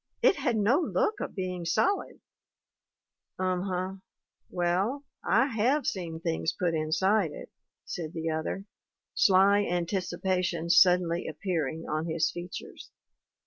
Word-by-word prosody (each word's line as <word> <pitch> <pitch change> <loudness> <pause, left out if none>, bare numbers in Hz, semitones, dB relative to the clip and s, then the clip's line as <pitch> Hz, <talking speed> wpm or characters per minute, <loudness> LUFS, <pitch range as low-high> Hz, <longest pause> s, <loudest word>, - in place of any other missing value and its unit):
'It - - +6
had 260 -5 0
no 220 +8 +3
look 405 +4 0
of - - -5
being 185 -2 -3
solid/ 370 - 0 0.6
" - - -63
'Um 185 -1 0
huh. 185 +1 -2 0.6
Well, 185 +10 0 0.2
I 235 +6 +3
have 250 +5 +1
seen 170 -8 -3
things 165 -1 -1
put 175 -3 -1
inside 160 +3 +1
it/ - - -10 0.3
said 160 -3 -5
the 165 -1 -4
other, 160 +5 -3 0.5
sly 195 +1 +5
anticipation 180 -1 -1
suddenly 175 0 +4
appearing 160 -3 -3
on 155 +2 -2
his 160 -1 +1
features. 175 +1 -8
180 Hz, 125 wpm, -28 LUFS, 165-200 Hz, 0.6 s, It